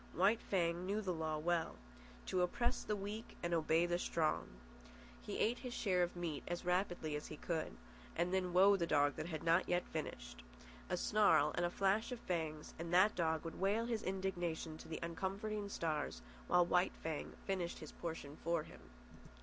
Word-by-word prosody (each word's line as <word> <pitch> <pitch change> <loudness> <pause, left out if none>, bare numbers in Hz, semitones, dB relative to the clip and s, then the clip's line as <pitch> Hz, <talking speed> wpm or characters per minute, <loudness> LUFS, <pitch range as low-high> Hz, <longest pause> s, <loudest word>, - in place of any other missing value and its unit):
White 200 +7 +4
Fang 170 -2 0
knew 205 +2 +1
the 190 -4 -1
law 160 -1 -1
well: 165 +1 0 0.5
to 185 - +1
oppress 235 +7 +1
the 210 - -1
weak 205 +3 -6
and 170 0 0
obey 165 +1 +3
the 175 0 0
strong. 160 -3 0 0.7
He - - -4
ate 235 +3 +2
his 250 -2 -5
share 185 -4 +2
of 175 0 0
meat 170 -4 -3
as 175 0 -3
rapidly 175 -4 0
as 150 - -4
he 155 - -7
could. 160 0 -3 0.4
And 175 +2 0
then 185 -1 +1
woe 195 +3 +7
the 170 -3 0
dog 145 -3 +3
that - - -3
had 160 -3 -4
not 170 +2 +3
yet 175 0 +2
finished! 60 0 -5 0.5
A - - 0
snarl 205 -8 +4
and 175 0 +1
a - - -3
flash 200 +6 +1
of 250 - -4
fangs, 160 -3 -3
and 170 0 -4
that 185 +4 +6
dog 160 -2 0
would 165 - -6
wail 205 +4 +2
his 230 -2 -1
indignation 175 -4 -2
to - - -10
the 160 - -4
uncomforting 200 +5 -3
stars 150 - -2 0.2
while 175 0 +5
White 180 +1 +2
Fang 160 -2 -3
finished 185 -3 -1
his 155 - -8
portion 160 -4 -6
for 170 -1 +1
him. - - -13
175 Hz, 190 wpm, -38 LUFS, 160-195 Hz, 0.7 s, woe